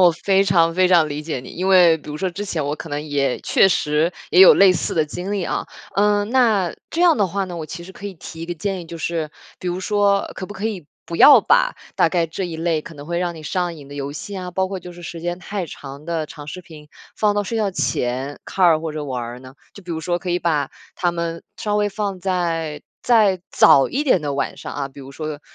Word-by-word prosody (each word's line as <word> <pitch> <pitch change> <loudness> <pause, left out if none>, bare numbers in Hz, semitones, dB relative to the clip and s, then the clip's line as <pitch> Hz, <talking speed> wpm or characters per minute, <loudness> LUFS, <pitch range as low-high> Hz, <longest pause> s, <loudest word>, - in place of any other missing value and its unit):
我 180 -2 +7
非 195 +3 +2
常 165 -3 +3
非 185 0 +4
常 170 -4 +4
理 145 +1 -4
解 150 -5 -4
你。 125 - -11
因 185 +2 -3
为 175 -4 +6
比 150 - -10
如 150 - -5
说 185 +3 -1
之 200 +4 -5
前 160 -7 -2
我 145 +1 -2
可 165 - -8
能 145 +1 -3
也 140 -3 0
确 195 - +4
实 155 0 +1 0.2
也 180 - +5
有 190 - +10
类 195 -2 +6
似 170 - -2
的 155 -2 +2
经 180 +6 -5
历 195 -4 -1
啊。 - - -2 0.3
嗯， 205 0 +2
那 220 -9 +3 0.2
这 335 - -2
样 350 -5 +5
的 200 -3 +2
话 195 +2 -2
呢， 180 -2 -7
我 160 - -4
其 170 - -7
实 190 - -11
可 205 - -8
以 195 - -7
提 165 0 -9
一 - - -5
个 175 - -4
建 190 +2 -3
议， - - -9
就 165 0 -9
是 160 -2 -2 0.3
比 185 - -8
如 180 +1 -2
说 200 0 +1
可 185 - -6
不 205 - -8
可 210 +3 -3
以 185 -9 -5 0.2
不 170 - -5
要 290 - +9
把 - - +3 0.2
大 - - +4
概 170 -2 +1
这 175 +4 -4
一 165 -2 -5
类 165 -1 0
可 165 - -11
能 145 +1 -10
会 170 0 -2
让 175 -1 -2
你 160 - -10
上 175 +2 -2
瘾 140 -3 -12
的 145 - -10
游 140 0 -4
戏 200 +5 -7
啊， 180 -1 -5
包 190 +1 -1
括 195 - -4
就 180 0 -10
是 175 0 -12
时 165 0 -7
间 175 +1 -3
太 195 0 -4
长 140 0 -10
的 165 -2 -2
长 145 -1 -10
视 185 +4 -7
频 155 -3 -14 0.3
放 210 -1 +2
到 205 - +1
睡 225 +3 -4
觉 210 -3 +1
前 130 -4 -2
看 190 - 0
儿 160 -2 +4
或 160 -2 -4
者 150 -1 -4
玩 125 -3 -3
儿 120 +1 -7
呢？ 130 +1 -13 0.2
就 200 - -12
比 175 - -9
如 160 - -3
说 175 +1 -1
可 180 - -7
以 175 - +1
把 155 -5 0 0.2
它 175 -2 0
们 170 -1 -4
稍 210 -1 -1
微 205 0 +2
放 200 -2 -3
在 165 -5 -2 0.2
再 210 -6 +4
早 135 - +6
一 290 +4 -1
点 220 - +3
的 145 -1 -2
晚 140 - -2
上 - - -7
啊， 140 -1 -3
比 140 - -13
如 135 0 -10
说 155 0 -6
175 Hz, 285 characters per minute, -21 LUFS, 155-195 Hz, 0.3 s, 有